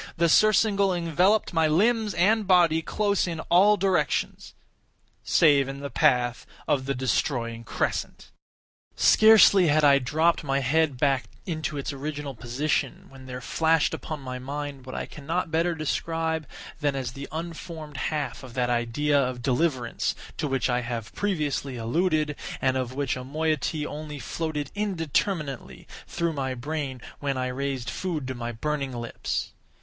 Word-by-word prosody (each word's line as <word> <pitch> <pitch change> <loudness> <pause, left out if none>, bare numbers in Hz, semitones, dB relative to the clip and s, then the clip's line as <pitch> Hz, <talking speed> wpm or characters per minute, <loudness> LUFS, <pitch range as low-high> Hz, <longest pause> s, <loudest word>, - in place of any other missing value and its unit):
The 170 0 +3
surcingle 200 -1 +4
enveloped 180 +5 +2
my 165 -1 +3
limbs 210 +5 +2
and 210 +3 +3
body 170 -4 +4
close 200 +2 0
in 165 -2 -4
all 200 +4 +6
directions—save 165 -5 0
in 135 0 -6
the 140 - -5
path 120 -1 +2 0.2
of 135 -2 +1
the 140 - 0
destroying 120 -2 -1
crescent. - - -3 0.6
Scarcely 215 -4 +6
had 155 0 +3
I 140 -1 +6
dropped 160 +7 +1
my 135 -1 0
head 145 +1 +1
back 135 -1 +1 0.2
into 155 -4 -3
its 140 +1 -3
original 145 0 -5
position, 125 +6 -2
when 135 -1 -13
there 125 0 -6
flashed 160 +5 +2
upon 155 -2 -5
my 130 -1 -6
mind 140 0 -6
what 130 - -6
I - - -3
cannot 165 +3 -3
better 165 +1 +1
describe 160 0 -2 0.3
than 145 -2 0
as 130 -3 -3
the 140 +2 -8
unformed 160 -2 -7
half 150 +1 -2
of 130 -3 -11
that 125 -1 +1
idea 140 +5 +1
of 125 -2 -3
deliverance 130 -2 0 0.2
to 150 - -1
which 135 -3 0
I 125 -1 +1
have 115 -2 -5
previously 150 -9 -2
alluded, 155 +5 0 0.2
and 130 -1 +1
of 130 -1 -2
which 140 -2 -1
a 125 - -6
moiety 155 +2 -1
only 150 0 -6
floated 150 0 -4
indeterminately 165 - -2 0.2
through 170 -1 -1
my 135 -3 -2
brain 135 -1 -4 0.2
when 140 -2 -2
I 130 0 -1
raised 130 -1 -3
food 160 -8 -3
to - - -2
my 120 -1 -4
burning 140 +3 -3
lips. 120 -1 -4
145 Hz, 150 wpm, -26 LUFS, 130-165 Hz, 0.6 s, all